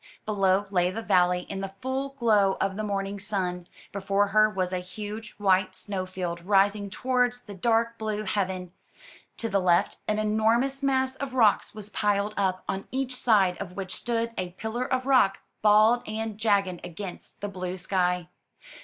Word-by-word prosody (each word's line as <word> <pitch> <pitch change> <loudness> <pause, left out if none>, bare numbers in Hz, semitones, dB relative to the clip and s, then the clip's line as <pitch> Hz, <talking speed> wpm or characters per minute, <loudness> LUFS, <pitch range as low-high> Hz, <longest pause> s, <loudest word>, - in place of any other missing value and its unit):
Below 195 -2 +2
lay 180 -2 +2
the 225 +5 -5
valley 180 -2 +3
in 195 +2 -6
the 195 0 -6
full 265 +3 -3
glow 210 -5 +3
of 195 0 0
the 215 - -3
morning 200 -1 -2
sun; 180 -3 -3 0.2
before 200 +1 +1
her 215 +1 +5
was 185 -3 -2
a 185 - 0
huge 210 +4 -7
white 190 -2 +2
snow 190 -2 -3
field 175 -2 -4
rising 200 +1 +2
towards 245 +2 0
the 205 - -10
dark 230 +3 +1
blue 215 -1 -2
heaven; 190 -3 -2 0.7
to 230 - -2
the 200 -2 +1
left, 175 -2 +2
an 215 - +1
enormous 225 +6 +1
mass 265 -1 +1
of 270 -2 -5
rocks 220 -3 +3
was 210 -1 -3
piled 205 0 0
up, 185 -2 0
on 195 0 -3
each 260 -1 -1
side 200 -8 +3
of 180 - -6
which 190 -1 -5
stood 230 -1 -1
a 180 -1 -4
pillar 230 +3 -3
of 255 0 0
rock, 255 -8 +4 0.2
bald 215 +3 +5
and 215 0 -4
jagged 200 -5 +1
against 180 +2 -8
the 205 - -3
blue 185 -2 -5
sky. 180 -1 0
205 Hz, 170 wpm, -27 LUFS, 185-225 Hz, 0.7 s, her